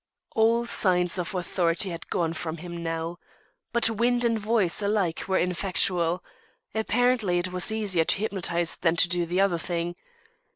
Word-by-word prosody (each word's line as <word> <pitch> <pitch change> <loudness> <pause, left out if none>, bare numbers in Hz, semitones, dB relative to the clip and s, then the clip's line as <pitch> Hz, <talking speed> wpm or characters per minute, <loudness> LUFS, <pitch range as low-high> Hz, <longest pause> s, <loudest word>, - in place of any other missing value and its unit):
All 230 +1 +3
signs 180 -5 +2
of 180 +2 -4
"authority" 175 +1 0
had 170 - -8
gone 165 -2 -1
from 160 0 -5
him 170 +1 -7
now. 165 +1 -3 0.5
But 235 -1 +4
wind 240 +2 +1
and 230 -1 +1
voice 210 -4 +1
alike 200 -5 0
were 190 -1 +1
ineffectual. 180 -1 +1 0.5
Apparently 225 -4 +1
it 180 +1 -1
was 180 +4 +2
easier 200 -7 +1
to - - +2
hypnotise 175 -5 -1
than 165 -1 +1
to 175 - +4
do 175 -1 0
the 180 +3 -1
other 195 -4 +2
thing. 170 0 -3
180 Hz, 160 wpm, -26 LUFS, 170-215 Hz, 0.5 s, But